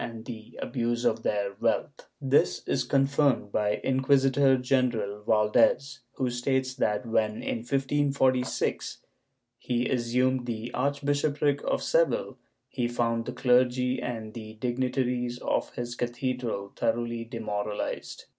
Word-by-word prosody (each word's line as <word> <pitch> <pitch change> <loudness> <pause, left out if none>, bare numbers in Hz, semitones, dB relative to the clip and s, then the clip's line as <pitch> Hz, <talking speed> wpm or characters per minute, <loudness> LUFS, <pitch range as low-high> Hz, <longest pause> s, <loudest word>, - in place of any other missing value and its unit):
II] - - -3
CLERICAL 115 -1 -8
DEMORALIZATION 120 -1 +1
497 105 +5 -1 0.3
This 140 0 +2
is - - +1
confirmed 135 -5 +2
by 105 0 +1
Inquisitor 135 0 +3
general 125 -5 0
Valdes 110 +5 +3 0.2
who 125 -2 -1
states 130 +1 0
that 105 -3 0
when, 110 -1 0
in - - -1
1546, 135 0 0 0.6
he 120 0 -1
assumed 125 +1 +1
the 115 0 -4
archbishopric 145 +1 0
of - - 0
Seville, - - +1 0.3
he 125 -2 -2
found 115 -1 0
the - - -2
clergy 125 0 +2
and 110 -3 -5
the 110 -2 -8
dignitaries 125 0 -1
of - - -1
his 120 0 -4
cathedral 120 -4 -3
thoroughly 115 0 -1
demoral 105 -3 -4
ized. - - -5
125 Hz, 115 wpm, -28 LUFS, 115-130 Hz, 0.6 s, Inquisitor